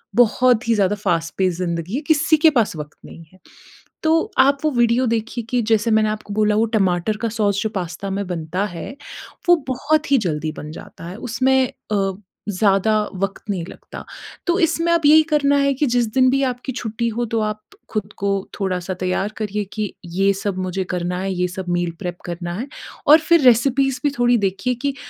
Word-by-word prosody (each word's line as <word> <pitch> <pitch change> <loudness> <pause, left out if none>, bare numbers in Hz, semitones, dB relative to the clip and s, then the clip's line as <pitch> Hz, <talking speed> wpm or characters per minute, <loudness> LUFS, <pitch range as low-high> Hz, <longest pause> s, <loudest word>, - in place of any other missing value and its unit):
बहुत 245 0 +3
ही 230 - +4
ज़्यादा 205 0 +2
fast 170 -5 -1
pace 185 -3 +1
ज़िंदगी 170 +3 -3
है, 285 - -1
किसी 315 0 +4
के 320 +1 +6
पास 235 - +1
वक़्त 150 0 -8
नहीं 165 - -12
है, 185 - -20 0.6
तो 325 +6 +2
आप 280 +1 +5
वो 310 - +4
वीडियो 240 +1 +2
देखिए 230 +1 -2
कि 245 -1 +1
जैसे 220 +2 +2
मैंने 215 0 +3
आपको 210 -1 -5
बोला 210 0 +2
वो 220 - +3
टमाटर 190 +2 +1
का 230 - +1
सॉस 205 -3 0
जो 220 - 0
पास्ता 185 +1 -4
में 200 +1 -2
बनता 175 +2 -3
है, 175 +1 -6 0.6
वो 350 - +9
बहुत 300 +4 0
ही 275 - +6
जल्दी 155 -5 -2
बन 150 +1 -7
जाता 165 - -11
है 180 - -7
उसमें 255 +2 +1 0.3
अ, 195 -1 +1 0.4
ज़्यादा 200 +2 +2 0.2
वक़्त 195 +1 -3
नहीं 180 -4 -3
लगता, - - -10 0.4
तो 345 +2 +2
इसमें 335 0 +2
अब 335 - +2
यही 310 +1 +7
करना 285 -1 +3
है 280 0 +2
कि 290 +3 +1
जिस 240 -1 +2
दिन 255 0 +4
भी 275 - +2
आपकी 255 +1 -2
छुट्टी 235 -1 -3
हो 240 +2 -2
तो - - +2
आप 215 0 -9 0.3
खुद 210 -1 -4
को 200 0 0 0.3
थोड़ा-सा 185 -1 -2
तैयार 185 +2 0
करिए 210 -1 -2
कि 215 -3 -3
ये 195 +3 +1
सब 195 -1 -3
मुझे 185 +1 -2
करना 180 +1 -2
है, 195 0 -2
ये 180 0 0
सब 185 0 -6
मील 175 -1 0
प्रेप 180 -2 -4
करना 175 0 -5
है 260 - -4 0.4
और 305 +2 +9
फिर 335 -2 +6
रेसिपीज़ 255 +1 +3
भी 290 - +2
थोड़ी 240 0 +4
देखिए 195 +5 -1
कि 280 -1 0
215 Hz, 200 wpm, -20 LUFS, 185-255 Hz, 0.6 s, वो